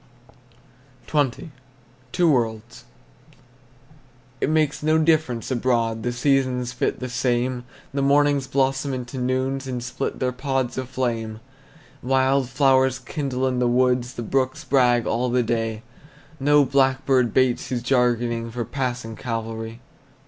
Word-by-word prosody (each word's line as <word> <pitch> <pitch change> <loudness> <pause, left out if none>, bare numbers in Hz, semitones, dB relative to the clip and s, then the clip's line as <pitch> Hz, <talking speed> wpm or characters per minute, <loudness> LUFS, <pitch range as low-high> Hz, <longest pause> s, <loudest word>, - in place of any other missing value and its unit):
XX. 145 +2 -1 0.6
TWO 175 0 +3
WORLDS. 115 -2 -2 1.6
It - - +1
makes 155 -2 +1
no 155 +1 +3
difference 155 -7 +1
abroad, 115 -3 0
The 120 - -1
seasons 125 -1 0
fit 125 - -1
the 130 - -4
same, 125 0 -1 0.3
The 140 - -1
mornings 140 0 +3
blossom 135 0 0
into 125 +1 -6
noons, 130 +2 -1
And 125 -2 -4
split 120 - -4
their 130 -1 0
pods 130 -1 -2
of 130 -1 -5
flame. 115 -4 -2 0.6
Wild 130 0 +2
flowers 130 -2 +3
kindle 130 -1 -3
in 130 -1 0
the 125 - +2
woods, 125 0 +1
The 120 - -4
brooks 130 +2 -1
brag 120 -4 +3
all 125 +2 0
the 125 0 +2
day; 115 -1 -2 0.6
No 145 +1 +4
blackbird 130 -2 +2
bates 130 0 +2
his 120 -2 -3
jargoning 120 -2 +1
For 120 0 -4
passing 125 -3 -3
Calvary. 115 0 -5
125 Hz, 130 wpm, -23 LUFS, 120-135 Hz, 1.6 s, No